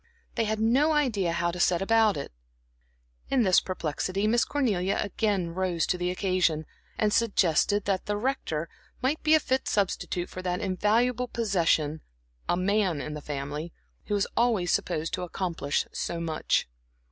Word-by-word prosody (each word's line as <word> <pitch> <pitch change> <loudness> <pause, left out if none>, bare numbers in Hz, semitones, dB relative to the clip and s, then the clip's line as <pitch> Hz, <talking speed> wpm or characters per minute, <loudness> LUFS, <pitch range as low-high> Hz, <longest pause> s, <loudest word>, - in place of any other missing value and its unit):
They 230 - 0
had 215 0 -1
no 265 +8 +3
idea 225 - +1
how 170 +1 0
to 180 - -7
set 175 0 +3
about 220 -2 +3
it. 140 - -5 1.0
In 260 -3 +3
this 185 -3 +5
perplexity 185 +3 -2
Miss 235 +2 +3
Cornelia 200 -10 0
again 200 -4 -1
rose 180 -2 0
to - - 0
the 180 0 -1
occasion, 180 -4 +1 0.3
and 210 -1 +1
suggested 205 -2 +2
that 195 -2 -1
the 205 0 0
Rector 205 - -2 0.4
might 280 +4 +1
be 315 0 +5
a - - +5
fit 265 -2 -1
substitute 185 -3 -1
for 185 - -7
that 180 -1 -2
invaluable 225 +6 +1
possession 170 -9 +1 0.5
"a 175 - +2
man 190 -3 +1
in 150 +1 -5
the 150 - -6
family," 145 +3 -5 0.3
who 210 - -1
is 200 - +1
always 225 -7 +2
supposed 155 +1 -1
to - - -2
accomplish 170 -4 -2
so 170 - -3
much. 160 - 0
190 Hz, 160 wpm, -27 LUFS, 170-220 Hz, 1.0 s, this